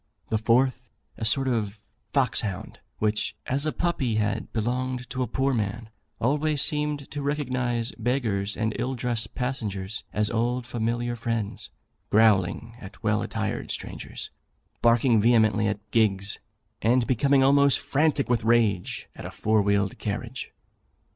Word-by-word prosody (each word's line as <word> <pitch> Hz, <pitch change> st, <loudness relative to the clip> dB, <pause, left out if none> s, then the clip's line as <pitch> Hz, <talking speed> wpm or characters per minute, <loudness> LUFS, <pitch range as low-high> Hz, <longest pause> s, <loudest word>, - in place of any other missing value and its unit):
The 110 Hz, -, +1 dB
fourth, 125 Hz, +2 st, +2 dB, 0.3 s
a -, -, -5 dB
sort 135 Hz, +5 st, +2 dB
of 110 Hz, -4 st, -1 dB, 0.3 s
fox 135 Hz, -4 st, +2 dB
hound, 95 Hz, -4 st, -5 dB, 0.2 s
which, 105 Hz, 0 st, 0 dB
as 140 Hz, +4 st, 0 dB
a -, -, +1 dB
puppy, 140 Hz, -11 st, 0 dB
had 105 Hz, -1 st, -1 dB
belonged 125 Hz, +2 st, -2 dB
to 130 Hz, -, -2 dB
a 125 Hz, -, 0 dB
poor 135 Hz, +1 st, 0 dB
man, 110 Hz, 0 st, -2 dB, 0.3 s
always 145 Hz, +4 st, +2 dB
seemed 150 Hz, -2 st, -1 dB
to 145 Hz, -, -4 dB
recognise 125 Hz, -5 st, -1 dB
beggars 110 Hz, -6 st, 0 dB
and 110 Hz, -1 st, -1 dB
ill 130 Hz, +1 st, -1 dB
dressed 120 Hz, -2 st, -2 dB
passengers 110 Hz, -6 st, -3 dB
as 105 Hz, 0 st, 0 dB
old 120 Hz, +2 st, 0 dB
familiar 120 Hz, +1 st, -1 dB
friends, 115 Hz, -3 st, -3 dB, 0.4 s
growling 110 Hz, +2 st, +3 dB
at 100 Hz, 0 st, -11 dB
well 105 Hz, -1 st, +2 dB
attired 110 Hz, -1 st, -3 dB
strangers, -, -, -5 dB, 0.5 s
barking 115 Hz, -1 st, +4 dB
vehemently 110 Hz, -2 st, +4 dB
at 105 Hz, 0 st, -4 dB
gigs, 100 Hz, -3 st, +2 dB, 0.4 s
and 120 Hz, +2 st, +3 dB
becoming 135 Hz, +2 st, +3 dB
almost 140 Hz, 0 st, +5 dB
frantic 150 Hz, -1 st, +1 dB
with 120 Hz, -1 st, +1 dB
rage 110 Hz, -5 st, +1 dB
at -, -, -7 dB
a -, -, -6 dB
four 110 Hz, 0 st, +1 dB
wheeled 100 Hz, -1 st, +1 dB
carriage. -, -, -4 dB
115 Hz, 140 wpm, -26 LUFS, 110-130 Hz, 0.5 s, almost